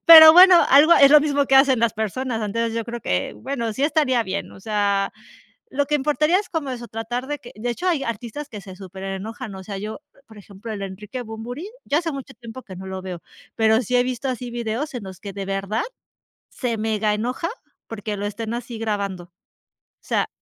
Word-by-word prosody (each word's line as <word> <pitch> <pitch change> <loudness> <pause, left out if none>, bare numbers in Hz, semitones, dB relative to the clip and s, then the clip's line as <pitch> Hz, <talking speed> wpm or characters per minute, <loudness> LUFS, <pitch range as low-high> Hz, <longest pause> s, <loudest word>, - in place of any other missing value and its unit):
pero 315 -1 +12
bueno, 365 +1 +9
algo 295 +5 +7
es 275 0 +7
lo 300 - +9
mismo 285 -2 +1
que 270 - +2
hacen 270 -2 +6
las 230 -1 +2
personas. 225 +2 -2
Antes, 230 +2 -1
yo 230 -1 -2
creo 235 0 -6
que, 90 - -1
bueno, 235 -3 -3
sí 270 +6 -1
estaría 280 -6 +2
bien, 190 -1 -4
o - - -13
sea, 200 -1 0 0.6
lo 285 +1 0
que 300 - +2
importaría 300 +5 +2
es 410 - -7
como 310 -5 -3
eso, 240 -2 -6
tratar 230 +3 -4
de 295 +1 -4
que 240 - -12
de 240 +3 -2
hecho, 360 +10 -3
hay 320 -6 +1
artistas 235 +5 -5
que 210 -6 -9
se 190 -2 -11
superenojan, 195 +4 -7
o 190 - -9
sea, 200 +1 -6
yo, 215 +5 -6 0.3
por 220 -1 -15
ejemplo, 205 +2 -10
el 205 - -5
de 195 - -3
Enrique 210 +6 -7
Bunbury, 240 - -7 0.2
ya 290 - +1
hace 330 -1 -1
mucho 275 -2 -7
tiempo 235 +2 -10
que 190 -5 -11
no 190 - -8
lo 190 0 -5
veo, 180 -3 -7 0.3
pero, 220 +1 +3
sí 250 +2 0
he 245 - +4
visto 255 +1 -3
así 250 -1 -4
videos 240 +5 -3
en 245 - -5
los 190 -1 -9
que 200 -1 -8
de 200 -1 -5
verdad 195 +3 -2 0.7
se 240 -3 -3
mega 215 -1 0
enoja 250 - -2 0.4
porque, 215 -1 -5
lo 205 - -3
estén 220 +2 -4
así 240 -1 -6
grabando, 200 -5 -3
o 175 - -30 0.7
sea. - - -1
230 Hz, 215 wpm, -22 LUFS, 205-270 Hz, 0.7 s, pero